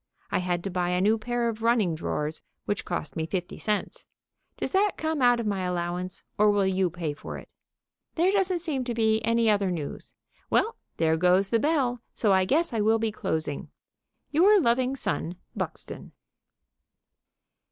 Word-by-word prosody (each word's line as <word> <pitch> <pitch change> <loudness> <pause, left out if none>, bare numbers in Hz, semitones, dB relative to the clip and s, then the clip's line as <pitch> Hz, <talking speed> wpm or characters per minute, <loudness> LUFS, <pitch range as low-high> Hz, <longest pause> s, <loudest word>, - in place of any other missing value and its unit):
I - - +2
had 175 -1 -1
to 195 - -3
buy 175 0 0
a 180 0 +1
new 215 +4 +3
pair 240 +2 -1
of 225 -1 -3
running 230 -7 +3
drawers, 155 -1 -3 0.2
which 205 - -2
cost 175 -3 -4
me 160 -1 -2
fifty 180 0 -4
cents. 210 -1 -2 0.5
Does - - -3
that 395 +1 +3
come 315 -2 -1
out 245 -1 +5
of 230 - -2
my 200 -2 -1
allowance? 180 0 -3 0.2
Or 210 0 +6
will 205 -1 +3
you 190 -1 +1
pay 165 -3 -3
for 145 - -7
it? - - -11 0.7
There 350 +3 +3
doesn't 380 -3 +1
seem 295 -6 -1
to 240 -2 -3
be 220 -1 +2
any 230 0 +2
other 205 -3 +3
news. 160 -5 -5 0.3
Well, 455 - +2 0.2
there 160 0 +2
goes 180 +3 +3
the 230 - +3
bell, 260 -5 +1
so 210 -4 +3
I 190 0 +4
guess 315 - +1
I 220 - +1
will 220 +2 +4
be 225 -1 -1
closing. 160 -7 -3 0.6
Your 395 +7 +6
loving 255 -2 +2
son, 175 -9 -2 0.2
BUXTON. - - -5
210 Hz, 175 wpm, -27 LUFS, 180-245 Hz, 0.7 s, Or